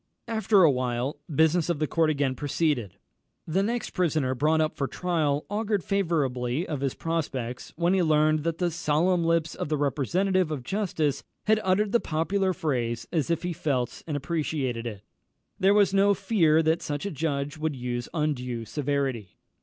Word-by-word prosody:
After 220 -3 +3
a 160 - +7
while 125 +2 -2
the 150 - -6
business 160 +3 +3
of 170 - +1
the 155 - 0
court 160 +1 +1
again 140 -3 +1
proceeded. 140 - -1 0.5
The 175 +4 +1
next 235 +4 -2
prisoner 155 -7 +1
brought 155 +5 +2
up 155 0 0
for 140 - -1
trial 155 -5 -1
augured 205 -2 -1
favourably 150 -6 0
of 145 -4 -3
his 135 -2 -1
prospects 135 -7 -3
when 175 +3 +2
he 190 - +3
learned 155 -1 +3
that 165 0 -1
the 175 -1 0
solemn 170 +3 +1
lips 165 -1 +1
of - - -4
the 155 - +1
representative 170 +6 +1
of 145 -5 -4
justice 165 - -1 0.2
had 215 0 +3
uttered 195 +2 +2
the 235 - +4
popular 185 +4 0
phrase 120 -9 -2
as 160 -1 0
if 170 0 0
he 175 0 -2
felt 135 -6 -2
and 150 -3 -1
appreciated 140 -5 -2
it. 105 -3 -7 0.6
There 195 +2 +4
was 200 -2 +4
no 200 +1 +4
fear 165 -7 +3
that 160 +1 +2
such 145 +3 -4
a 200 - -2
judge 145 -1 -2
would 155 -2 -1
use 120 -1 -4
undue 125 -7 -2
severity. 135 - -2
155 Hz, 175 wpm, -27 LUFS, 135-175 Hz, 0.6 s, a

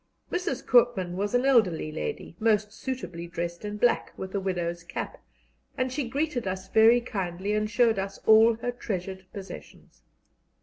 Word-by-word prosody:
Mrs. 365 +3 -2
Koopman 230 -8 +3
was 205 +4 -1
an 245 +2 +2
elderly 200 - +3
lady, 160 +1 -5
most 215 -1 +2
suitably 180 -11 -5
dressed 170 +1 -4
in 210 0 -4
black, 240 +2 +2
with 190 0 -6
a 200 - 0
widow's 175 -3 -2
cap, - - -6 0.6
and 255 0 -1
she 260 -3 -2
greeted 280 -4 -1
us 185 0 -4
very 225 +3 +6
kindly 195 -3 -3
and 215 0 0
showed 230 -3 +3
us 195 0 -4
all 220 +1 +7
her 245 +2 -3
treasured 190 -5 -5
possessions. 195 -2 -11
210 Hz, 160 wpm, -27 LUFS, 185-240 Hz, 0.6 s, all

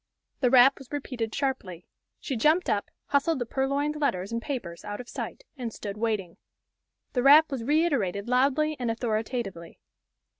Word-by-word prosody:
The 250 - +3
rap 260 +2 +6
was 270 - -14
repeated 255 -6 -4
sharply. 205 - -3 0.3
She 270 - -4
jumped 310 +10 +3
up, 205 - -1 0.2
hustled 285 +3 +2
the 245 - -2
purloined 280 +4 -1
letters 200 -9 -1
and 230 0 -2
papers 230 - -5
out 205 0 -5
of 250 - -8
sight, - - -6
and 240 -3 -4
stood 200 -2 -6
waiting. 210 -6 -2 0.8
The 250 - +1
rap 295 +4 +7
was 260 -4 -3
reiterated 255 - +1
loudly 280 +5 +2
and 245 -2 -1
authoritatively. 225 -6 -3
250 Hz, 155 wpm, -27 LUFS, 215-280 Hz, 0.8 s, rap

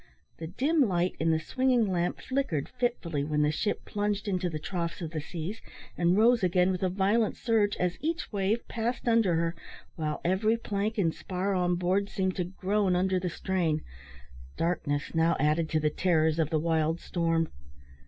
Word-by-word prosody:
The 160 - -6
dim 290 - +1
light 180 -1 0
in 165 - +1
the 160 -1 +3
swinging 255 +6 +2
lamp 175 -3 -1
flickered 260 - -1
fitfully 235 - -2
when 150 0 +1
the 150 - +2
ship 205 +7 -2
plunged 205 0 -2
into 185 -2 0
the 155 - -4
troughs 170 +1 -4
of 165 -3 -5
the 155 -2 -3
seas, 170 +7 -6 0.3
and 175 +2 +2
rose 235 +2 +5
again 180 0 +3
with 185 - -3
a 185 - +2
violent 205 +4 +1
surge, 220 -4 +1
as 180 -1 -1
each 330 +2 -2
wave 205 +3 0
passed 235 +2 -3
under 225 -7 +4
her, 165 0 0 0.4
while 155 -2 -2
every 210 +6 +2
plank 215 0 -2
and 165 -6 +2
spar 190 +2 -2
on 180 -1 +1
board 185 +3 0
seemed 190 -2 -1
to 180 - 0
groan 190 +1 0
under 185 +1 +2
the 180 0 -2
strain. 170 -3 -1 0.7
Darkness 155 -4 -1
now 165 +1 +2
added 155 +2 +2
to 155 - +1
the 150 0 +1
terrors 160 -3 +2
of 155 -2 +1
the 160 - +1
wild 160 +1 +1
storm. 165 -2 0
180 Hz, 185 wpm, -29 LUFS, 165-205 Hz, 0.7 s, rose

